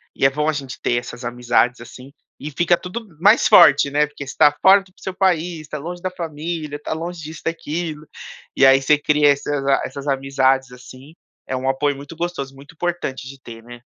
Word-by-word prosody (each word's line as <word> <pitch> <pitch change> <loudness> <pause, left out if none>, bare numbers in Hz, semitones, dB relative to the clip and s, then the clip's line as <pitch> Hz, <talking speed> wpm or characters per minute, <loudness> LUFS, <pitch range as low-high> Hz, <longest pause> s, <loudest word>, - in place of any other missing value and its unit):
e - - +1
é - - +7
bom 150 +3 -1
a - - +3
gente 135 -3 -7
ter - - 0
essas 120 0 -10
amizades, 120 0 0
assim. 125 +3 -12 0.3
E 150 - -6
fica 175 +4 +2
tudo 205 +7 -7
mais 205 +6 +5
forte, 145 -4 +6
né. 150 +1 +2
Porque 145 -1 -9
você 135 - -7
está 145 - +5
fora 195 +1 +7
do 195 -1 -21
seu 190 - -6
país, 175 -3 0
está 150 0 -7
longe 175 +4 -7
da 185 - -2
família, 160 -2 -5
está 150 - -5
longe 170 +1 -6
disso 155 +1 -9
e - - -31
daquilo 155 -1 -6 0.5
e 135 - +5
aí 135 0 +6
você 150 +2 +3
cria 150 0 +3
essas 140 0 -2
a 135 - +3
essas 140 +1 -8
amizades, 135 -1 +1
assim. 130 +3 -14 0.3
É 130 - -3
um 130 +1 -3
apoio 140 +1 0
muito 140 +4 -11
gostoso, 160 -5 -4
muito 140 +3 -15
importante 165 -6 -4
de 135 +1 -11
ter, 115 -2 -11
né. 120 0 -12
145 Hz, 215 wpm, -20 LUFS, 135-165 Hz, 0.5 s, é